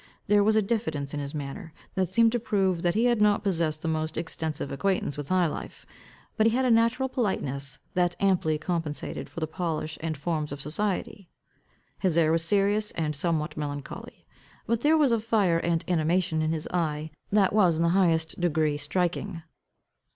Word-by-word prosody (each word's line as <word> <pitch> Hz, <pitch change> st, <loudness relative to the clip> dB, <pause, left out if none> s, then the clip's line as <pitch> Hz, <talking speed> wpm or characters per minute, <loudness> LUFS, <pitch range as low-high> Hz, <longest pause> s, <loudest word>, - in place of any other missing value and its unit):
There 205 Hz, 0 st, +4 dB
was 215 Hz, +1 st, +3 dB
a 220 Hz, -, +4 dB
diffidence 160 Hz, -11 st, -2 dB
in 150 Hz, -, -2 dB
his 140 Hz, +1 st, -5 dB
manner, 150 Hz, +4 st, -6 dB, 0.2 s
that 185 Hz, -2 st, 0 dB
seemed 230 Hz, +4 st, +4 dB
to 240 Hz, -, 0 dB
prove 190 Hz, -6 st, 0 dB
that 175 Hz, +1 st, +1 dB
he 225 Hz, +3 st, +3 dB
had 240 Hz, -3 st, +2 dB
not 210 Hz, 0 st, +3 dB
possessed 165 Hz, -5 st, 0 dB
the -, -, -2 dB
most 155 Hz, 0 st, -2 dB
extensive 160 Hz, -3 st, -3 dB
acquaintance 165 Hz, 0 st, -1 dB
with 145 Hz, -1 st, -6 dB
high 185 Hz, -1 st, +3 dB
life; 160 Hz, -, -6 dB, 0.5 s
but 220 Hz, 0 st, +4 dB
he 225 Hz, -, +2 dB
had 260 Hz, +1 st, +2 dB
a 250 Hz, -, +3 dB
natural 230 Hz, +3 st, +3 dB
politeness 140 Hz, -, -2 dB, 0.2 s
that 175 Hz, -1 st, +1 dB
amply 180 Hz, -6 st, +2 dB
compensated 160 Hz, -2 st, -3 dB
for -, -, -7 dB
the -, -, +1 dB
polish 160 Hz, -2 st, -3 dB
and 160 Hz, -1 st, -3 dB
forms 150 Hz, 0 st, -2 dB
of 145 Hz, -, -5 dB
society. 190 Hz, +4 st, -3 dB, 0.7 s
His 180 Hz, -4 st, +1 dB
air 160 Hz, -2 st, +4 dB
was 165 Hz, 0 st, +2 dB
serious 205 Hz, +4 st, +2 dB
and 155 Hz, -2 st, -2 dB
somewhat 155 Hz, 0 st, -1 dB
melancholy; 145 Hz, -2 st, -6 dB, 0.4 s
but 230 Hz, +1 st, 0 dB
there 310 Hz, +4 st, +4 dB
was 290 Hz, -5 st, +4 dB
a 230 Hz, -, +3 dB
fire 210 Hz, -6 st, +2 dB
and 165 Hz, -1 st, 0 dB
animation 170 Hz, 0 st, +1 dB
in 155 Hz, 0 st, 0 dB
his 160 Hz, -1 st, -3 dB
eye 155 Hz, -3 st, -1 dB, 0.2 s
that 200 Hz, -2 st, +3 dB
was 185 Hz, -6 st, +4 dB
in 165 Hz, -, +1 dB
the 170 Hz, -, +3 dB
highest 165 Hz, -3 st, +2 dB
degree 155 Hz, -3 st, +1 dB
striking. 175 Hz, +3 st, -2 dB
170 Hz, 190 wpm, -27 LUFS, 155-205 Hz, 0.7 s, There